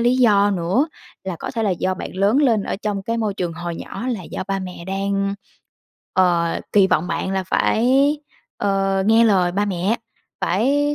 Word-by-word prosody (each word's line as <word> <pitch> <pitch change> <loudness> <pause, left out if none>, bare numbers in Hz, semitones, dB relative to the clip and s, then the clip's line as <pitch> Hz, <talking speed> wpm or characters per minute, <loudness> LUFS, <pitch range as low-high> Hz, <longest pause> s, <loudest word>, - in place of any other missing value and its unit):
lý 245 +2 +3
do 205 -5 +4
nữa 195 - +1 0.4
là 185 -3 -4
có - - -5
thể 230 -3 -2
là 205 - +1
do 185 +1 -1
bạn 185 - -7
lớn 200 +6 +2
lên 225 -7 +3
ở - - -3
trong 205 -1 -3
cái 230 +4 -2
môi 215 -3 -1
trường 175 -3 -3
hồi 170 +1 -5
nhỏ 240 - -6
là 225 -7 -2
do - - -5
ba 195 - 0
mẹ 180 -2 -7
đang, 195 +1 -1 0.8
ờ, 175 -2 +2
kỳ 200 -2 +6
vọng 170 -1 +1
bạn 190 +2 -2
là 190 -1 -1
phải, 235 +3 +2 0.7
ờ, 195 -1 +1
nghe 225 +1 +5
lời 185 -5 +3
ba 200 +3 +1
mẹ, 195 +3 0 0.4
phải 280 +10 +1
195 Hz, 190 wpm, -21 LUFS, 185-220 Hz, 0.8 s, kỳ